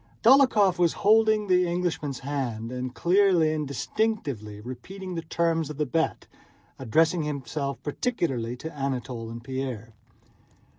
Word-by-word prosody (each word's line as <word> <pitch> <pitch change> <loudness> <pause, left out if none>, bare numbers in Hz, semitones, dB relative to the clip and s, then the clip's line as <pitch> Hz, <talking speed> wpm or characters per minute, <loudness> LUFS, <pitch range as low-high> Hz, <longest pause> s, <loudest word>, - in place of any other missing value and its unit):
Dólokhov 225 -8 +5
was 170 -2 +3
holding 215 0 +5
the 180 -2 +3
Englishman's 170 -6 -2
hand 125 -5 -3
and 125 0 -5
clearly 175 -3 +3
and 150 -2 -2
distinctly 140 - -2
repeating 185 - -8
the 165 - -3
terms 165 -1 0
of 150 - -7
the 150 - 0
bet, 160 +5 -1 0.5
addressing 160 +7 +2
himself 140 -1 -3
particularly 140 - -2
to 160 +5 -7
Anatole 125 -4 -3
and 115 0 -8
Pierre. 125 -4 -5
150 Hz, 130 wpm, -26 LUFS, 130-180 Hz, 0.5 s, Dólokhov